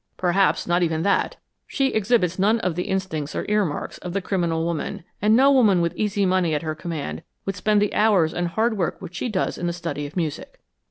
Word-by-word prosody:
Perhaps 185 Hz, +2 st, +2 dB
not 175 Hz, +1 st, +1 dB
even 160 Hz, -2 st, 0 dB
that. 200 Hz, -, +1 dB, 0.3 s
She 270 Hz, -2 st, +1 dB
exhibits 195 Hz, -5 st, +1 dB
none 215 Hz, +4 st, +3 dB
of 180 Hz, -4 st, 0 dB
the 180 Hz, +2 st, -3 dB
instincts 175 Hz, -6 st, -3 dB
or -, -, -2 dB
earmarks 205 Hz, -8 st, -1 dB
of 180 Hz, -1 st, -6 dB
the 200 Hz, -, -1 dB
criminal 170 Hz, -4 st, -1 dB
woman, 170 Hz, -1 st, -3 dB, 0.2 s
and 215 Hz, +2 st, +4 dB
no 270 Hz, +3 st, +6 dB
woman 220 Hz, -9 st, +5 dB
with 170 Hz, -1 st, 0 dB
easy 205 Hz, -2 st, 0 dB
money 180 Hz, -4 st, +2 dB
at 150 Hz, -, -2 dB
her 155 Hz, -1 st, -2 dB
command 160 Hz, -1 st, -5 dB, 0.2 s
would 195 Hz, -, -2 dB
spend 210 Hz, +2 st, +2 dB
the 205 Hz, 0 st, 0 dB
hours 200 Hz, -7 st, +3 dB
and 175 Hz, 0 st, -1 dB
hard 220 Hz, +4 st, 0 dB
work 175 Hz, -, -1 dB
which 175 Hz, -, -9 dB
she 245 Hz, -, -3 dB
does 195 Hz, -4 st, -1 dB
in 175 Hz, -, -2 dB
the 170 Hz, -, -1 dB
study 165 Hz, -4 st, -4 dB
of 150 Hz, -, -11 dB
music. 160 Hz, -4 st, -4 dB
180 Hz, 220 wpm, -23 LUFS, 170-210 Hz, 0.3 s, no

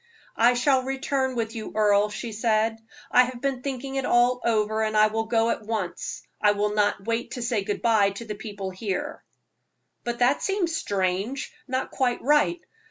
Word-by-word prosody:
"I 240 Hz, +2 st, +4 dB
shall 260 Hz, +2 st, +3 dB
return 265 Hz, 0 st, -1 dB
with 225 Hz, -1 st, -2 dB
you, 220 Hz, -1 st, -6 dB
Earle," 210 Hz, -1 st, +3 dB
she 220 Hz, +2 st, -5 dB
said. 225 Hz, 0 st, +1 dB, 0.3 s
"I 250 Hz, -, +6 dB
have 250 Hz, -1 st, -7 dB
been 265 Hz, -1 st, -2 dB
thinking 270 Hz, 0 st, -4 dB
it 270 Hz, -, 0 dB
all 245 Hz, 0 st, +3 dB
over, 220 Hz, -1 st, +1 dB
and 215 Hz, 0 st, 0 dB
I 215 Hz, -, +7 dB
will 225 Hz, +1 st, -1 dB
go 225 Hz, 0 st, +2 dB
at -, -, -3 dB
once. 210 Hz, -5 st, -4 dB, 0.2 s
I 210 Hz, -1 st, +5 dB
will 210 Hz, 0 st, 0 dB
not 205 Hz, -1 st, +1 dB
wait 230 Hz, +1 st, -1 dB
to 245 Hz, -, -4 dB
say 235 Hz, -4 st, 0 dB
good 205 Hz, +1 st, -3 dB
bye 220 Hz, -4 st, +4 dB
to 200 Hz, +4 st, -8 dB
the 215 Hz, -, -4 dB
people 205 Hz, -2 st, -6 dB
here." 190 Hz, 0 st, -4 dB, 0.8 s
"But 240 Hz, 0 st, -3 dB
that 250 Hz, +4 st, +3 dB
seems 380 Hz, -5 st, 0 dB
strange 195 Hz, -, -2 dB
not 260 Hz, 0 st, -2 dB
quite 250 Hz, -3 st, 0 dB
right. 300 Hz, +5 st, +3 dB
230 Hz, 185 wpm, -25 LUFS, 210-255 Hz, 0.8 s, I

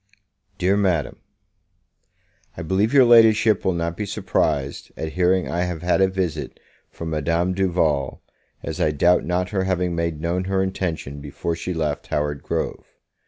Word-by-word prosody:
Dear 95 Hz, +2 st, +2 dB
Madam, 85 Hz, -9 st, 0 dB, 1.4 s
I 85 Hz, -, -5 dB
BELIEVE 95 Hz, +7 st, +1 dB
your 135 Hz, -3 st, +6 dB
Ladyship 115 Hz, -2 st, +5 dB
will 95 Hz, -, +1 dB
not 85 Hz, 0 st, -2 dB
be 105 Hz, +1 st, -4 dB
surprised 70 Hz, -6 st, -1 dB
at 80 Hz, -, -4 dB
hearing 90 Hz, +1 st, +2 dB
I 85 Hz, -, -2 dB
have 85 Hz, -2 st, -5 dB
had 90 Hz, +2 st, +2 dB
a 95 Hz, -, +5 dB
visit 90 Hz, -5 st, -3 dB, 0.3 s
from 80 Hz, -1 st, -7 dB
Madame 85 Hz, +4 st, 0 dB
Duval, 85 Hz, -7 st, 0 dB, 0.4 s
as -, -, -4 dB
I -, -, +3 dB
doubt 85 Hz, +4 st, +3 dB
not 90 Hz, +1 st, -1 dB
her 95 Hz, -2 st, -1 dB
having 90 Hz, -2 st, 0 dB
made 85 Hz, -2 st, -2 dB
known 85 Hz, +3 st, -1 dB
her 95 Hz, 0 st, +1 dB
intention 85 Hz, -7 st, -4 dB
before 75 Hz, +3 st, -4 dB
she 90 Hz, +2 st, -5 dB
left 75 Hz, -3 st, -2 dB
Howard 75 Hz, -1 st, -2 dB
Grove. -, -, -3 dB
90 Hz, 160 wpm, -22 LUFS, 80-95 Hz, 1.4 s, your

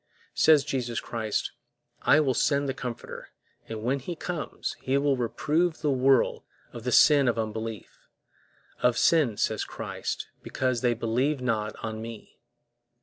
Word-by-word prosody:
Says 155 Hz, -3 st, +5 dB
Jesus 125 Hz, -5 st, -2 dB
Christ, 110 Hz, -3 st, -3 dB, 0.5 s
"I 145 Hz, -, +5 dB
will 135 Hz, -4 st, +1 dB
send 140 Hz, +3 st, +1 dB
the 135 Hz, -, -1 dB
Comforter; 125 Hz, -3 st, -7 dB, 0.4 s
and 110 Hz, -1 st, -5 dB
when 135 Hz, +4 st, 0 dB
He 155 Hz, +7 st, -5 dB
is -, -, -13 dB
come, 155 Hz, -9 st, -5 dB, 0.2 s
He 135 Hz, +1 st, +1 dB
will 140 Hz, 0 st, +2 dB
reprove 155 Hz, +7 st, 0 dB
the 150 Hz, -2 st, +1 dB
world" 135 Hz, 0 st, +3 dB, 0.3 s
of 120 Hz, -1 st, -9 dB
the 125 Hz, -, 0 dB
sin 145 Hz, +1 st, +6 dB
of 120 Hz, -, +1 dB
unbelief; 110 Hz, -1 st, -5 dB, 0.7 s
"of 125 Hz, -1 st, +3 dB
sin," 145 Hz, -11 st, +3 dB
says 110 Hz, -1 st, 0 dB
Christ, -, -, -5 dB
"because 130 Hz, -2 st, -1 dB
they 120 Hz, -1 st, +2 dB
believe 125 Hz, +6 st, 0 dB
not 110 Hz, -4 st, -1 dB
on 110 Hz, 0 st, -5 dB
Me." 115 Hz, -1 st, -10 dB
125 Hz, 150 wpm, -27 LUFS, 115-140 Hz, 0.7 s, sin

